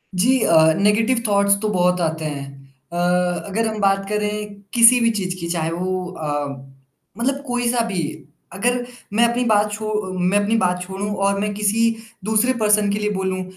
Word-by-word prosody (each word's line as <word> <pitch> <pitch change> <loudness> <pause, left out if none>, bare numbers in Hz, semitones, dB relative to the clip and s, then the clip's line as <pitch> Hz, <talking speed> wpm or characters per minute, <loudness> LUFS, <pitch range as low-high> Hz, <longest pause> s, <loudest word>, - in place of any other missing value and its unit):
जी 250 +8 +3
अ, 160 -1 +5
negative 215 +6 +2
thoughts 200 0 +3
तो 215 - -1
बहुत 180 -2 +1
आते 160 -1 -2
हैं 140 -2 -4 0.5
अ, - - -7 0.5
अगर 220 +3 -1
हम 220 -1 -4
बात 195 0 +2
करें 210 0 -2 0.2
किसी 240 +1 +7
भी 230 -1 +3
चीज़ 185 -1 -3
की 170 - -4
चाहे 165 -1 -1
वो 185 +1 -2
अ, 145 -3 -3 0.7
मतलब 275 +4 -1
कोई 245 -1 -1
सा 240 -1 +1
भी 185 -6 -2 0.5
अगर 245 +5 0 0.3
मैं 230 +3 +3
अपनी 240 +1 -1
बात 210 -1 +2
छो 215 0 -4 0.3
मैं 180 +3 +2
अपनी 220 +3 +1
बात 180 -3 0
छोड़ूँ 195 +3 -5
और 200 0 +1
मैं 205 0 -2
किसी 210 +2 +1 0.4
दूसरे 220 +4 +2
पर्सन 210 -1 +3
के 205 - -1
लिए 210 0 -1
बोलूँ, 190 -2 -2
205 Hz, 180 wpm, -20 LUFS, 180-220 Hz, 0.7 s, किसी